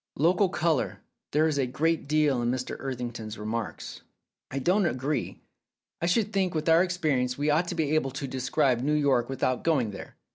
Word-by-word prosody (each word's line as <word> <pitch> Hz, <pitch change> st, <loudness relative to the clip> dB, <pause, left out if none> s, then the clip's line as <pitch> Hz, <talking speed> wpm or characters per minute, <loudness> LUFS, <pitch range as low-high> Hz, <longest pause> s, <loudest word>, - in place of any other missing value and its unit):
"Local 180 Hz, +6 st, +3 dB
colour. 160 Hz, -6 st, 0 dB, 0.3 s
There 155 Hz, +2 st, +3 dB
is 150 Hz, -3 st, 0 dB
a 130 Hz, -, +1 dB
great 155 Hz, +4 st, 0 dB
deal 150 Hz, -4 st, +2 dB
in 120 Hz, -, 0 dB
Mr. 125 Hz, 0 st, -2 dB
Etherington's 120 Hz, -4 st, -5 dB
remarks." 110 Hz, 0 st, -5 dB, 0.5 s
"I 135 Hz, -, -5 dB
don't 180 Hz, +7 st, +2 dB
agree. 140 Hz, +1 st, -2 dB, 0.6 s
I 170 Hz, -, +1 dB
should 210 Hz, +4 st, +1 dB
think 190 Hz, -3 st, 0 dB
with 155 Hz, 0 st, -2 dB
our 165 Hz, +2 st, +6 dB
experi 165 Hz, -8 st, 0 dB
ence 125 Hz, 0 st, -2 dB
we 145 Hz, +1 st, +1 dB
ought 165 Hz, +4 st, +2 dB
to 175 Hz, -, -3 dB
be 155 Hz, -3 st, 0 dB
able 155 Hz, -4 st, +2 dB
to 135 Hz, +1 st, -5 dB
describe 130 Hz, -1 st, +1 dB
New 150 Hz, +3 st, +1 dB
York 135 Hz, -5 st, +2 dB
with 135 Hz, -, -5 dB
out 130 Hz, -1 st, +1 dB
going 135 Hz, -10 st, +1 dB
there. 100 Hz, -, -10 dB
145 Hz, 195 wpm, -27 LUFS, 125-165 Hz, 0.6 s, our